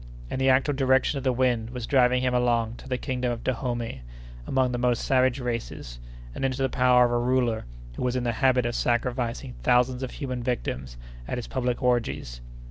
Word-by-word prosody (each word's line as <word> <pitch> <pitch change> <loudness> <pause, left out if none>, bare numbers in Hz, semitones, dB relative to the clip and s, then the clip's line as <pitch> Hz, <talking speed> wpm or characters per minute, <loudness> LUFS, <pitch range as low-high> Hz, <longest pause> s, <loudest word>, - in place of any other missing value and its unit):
And 130 - -2
the 135 - +4
actual 130 +3 +3
direction 135 +1 +2
of - - -8
the 130 - +2
wind 120 -3 +1
was 125 -2 -5
driving 125 -1 +3
him 125 -1 +1
along 120 -2 +1
to 135 - -12
the 125 - 0
kingdom 125 -2 -2
of 120 -1 -5
Dahomey, 120 - -2 0.5
among 130 -1 +1
the 120 - -2
most 120 -1 +1
savage 130 -1 +2
races, 115 - -5 0.3
and - - -5
into 135 0 0
the 135 - +1
power 125 -1 +4
of 120 - 0
a 120 - +1
ruler 120 -2 +1 0.3
who - - -5
was 125 0 0
in 125 - -1
the 120 - +1
habit 125 +1 +2
of 120 - -1
sacrificing 120 +1 -1
thousands 125 0 +2
of 130 - -3
human 130 -3 -4
victims 65 - -3 0.3
at - - -3
his 120 - -4
public 125 -1 -2
orgies. 115 - -1
125 Hz, 205 wpm, -26 LUFS, 120-130 Hz, 0.5 s, the